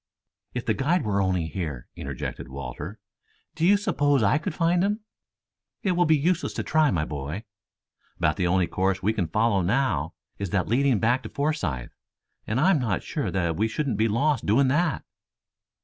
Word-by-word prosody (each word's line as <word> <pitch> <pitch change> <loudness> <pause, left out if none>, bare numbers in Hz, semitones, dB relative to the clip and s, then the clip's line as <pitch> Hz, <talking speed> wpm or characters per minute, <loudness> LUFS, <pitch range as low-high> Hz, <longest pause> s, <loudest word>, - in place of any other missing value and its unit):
"If 125 - -3
the - - +2
guide 155 +2 +1
were 100 -2 +1
only 95 -3 +1
here!" 80 -6 -5
interjected 70 -3 -5
Walter. 70 - -7 0.6
"Do 160 - -4
you 200 +4 +6
suppose 145 - +2
I 100 +9 +3
could 155 - -4
find 175 +1 +2
him?" 210 +2 0 0.8
"It 190 - +2
will 175 -1 +2
be 155 -1 +5
useless 170 +5 0
to - - -3
try, 155 -1 +3
my 80 -10 0
boy. 75 +8 -5 0.7
About 75 - +2
the 90 - 0
only 90 0 +3
course 95 +2 -1
we 110 +3 +2
can 95 -6 -1
follow 105 +3 +2
now, 130 +9 0 0.2
is 100 -2 -3
that 95 0 0
leading 130 +2 +3
back 120 +5 +2
to - - -8
Forsythe, 95 - -2 0.6
and 110 +4 0
I 180 +7 +5
am 165 - +3
not 110 -8 -1
sure - - -2
that 85 -3 0
we 110 +7 +1
shouldn't 125 0 -2
be 110 +2 +3
lost 140 +7 +1
doing 130 +6 +4
that." 160 +3 +1
110 Hz, 185 wpm, -26 LUFS, 90-150 Hz, 0.8 s, you